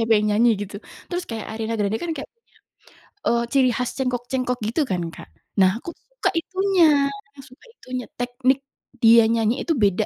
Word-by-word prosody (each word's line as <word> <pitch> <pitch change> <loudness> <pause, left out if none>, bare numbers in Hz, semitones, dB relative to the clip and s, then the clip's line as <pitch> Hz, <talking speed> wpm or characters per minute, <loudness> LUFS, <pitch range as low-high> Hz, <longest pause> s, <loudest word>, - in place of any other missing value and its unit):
siapa 225 0 +2
yang 210 0 +1
nyanyi?" 235 +2 +5
gitu. 200 +1 -9 0.3
Terus 355 0 -2
kayak 225 -2 -5
Ariana 225 +1 -3
Grande 205 +2 +1
kan 340 -1 -2
kayak - - -6
punya, 465 0 -33 0.7
eee, 235 0 +2
ciri 260 -2 +4
khas 250 0 -1
cengkok-cengkok 250 -1 -1
gitu 290 +7 +1
kan, 185 -4 -1
Kak. - - -12 0.3
Nah, 190 +4 +3
aku 340 - -7
suka - - -5
itunya, 335 -5 +3 0.3
ya - - -17
suka 255 0 -18
itunya, 255 - -6
teknik 255 +2 +1 0.4
dia 230 0 +7
nyanyi 230 +2 +1
itu - - -1
beda 205 -1 +2
245 Hz, 180 wpm, -23 LUFS, 225-280 Hz, 0.7 s, dia